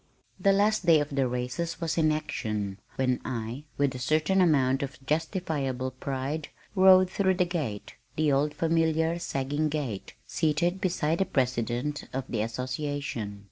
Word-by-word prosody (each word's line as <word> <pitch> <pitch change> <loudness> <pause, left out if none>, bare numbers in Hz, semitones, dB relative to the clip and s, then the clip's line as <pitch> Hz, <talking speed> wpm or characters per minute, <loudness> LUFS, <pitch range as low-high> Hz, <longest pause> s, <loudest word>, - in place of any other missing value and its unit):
The 200 - +4
last 205 +2 +3
day 165 -2 +7
of 145 0 -2
the 135 -2 +1
races 125 +7 -3
was 165 -1 -1
in 155 -2 +3
action 105 -10 -3 0.2
when 130 -1 +1
I, 120 +3 -4
with 140 -1 +2
a 130 - -6
certain 155 +8 +2
amount 135 -5 +3
of 135 -2 -4
justifiable 150 -5 -1
pride, 135 +4 -3 0.3
rode 185 -1 +7
through 190 0 +1
the 180 0 +2
gate 150 - -4 0.2
(the 155 -1 +2
old 145 +2 +1
familiar 165 0 +1
sagging 145 -1 -1
gate) 140 -10 -4
seated 170 +4 0
beside 170 -4 0
the 195 - +3
President 125 - -1
of 135 +1 -2
the 110 - -1
Association. 125 -2 -3
145 Hz, 150 wpm, -28 LUFS, 130-165 Hz, 0.3 s, day